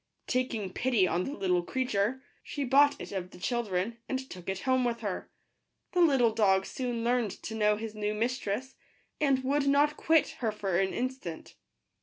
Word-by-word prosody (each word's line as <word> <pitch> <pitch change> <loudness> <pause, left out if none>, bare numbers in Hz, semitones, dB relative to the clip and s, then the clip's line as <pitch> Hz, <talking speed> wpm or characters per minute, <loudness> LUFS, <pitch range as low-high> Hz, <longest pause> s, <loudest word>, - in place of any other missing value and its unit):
Taking 230 -7 -1
pity 240 -7 +2
on 175 +1 0
the 280 - -4
little 180 -9 +1
creature, 250 +3 -1 0.2
she 285 - -4
bought 280 +3 +4
it - - -7
of 185 -2 -4
the - - -14
children, 230 0 -1
and 265 - 0
took 180 0 -7
it 190 0 -3
home 260 -1 +2
with 235 -1 -1
her. 205 -4 -4 0.6
The 360 - +2
little 265 -9 +4
dog 195 -3 +3
soon 245 -3 -3
learned 240 -2 +2
to 220 - -5
know 210 -1 +3
his 220 0 -5
new 210 0 -2
mis 245 +4 0
tress, 250 +6 -3 0.5
and 275 -3 +2
would 280 +2 +1
not 290 +2 +3
quit 320 -1 +3
her 225 -3 0
for 195 -4 -1
an 190 0 +1
instant. 250 -10 -4
235 Hz, 185 wpm, -30 LUFS, 200-260 Hz, 0.6 s, bought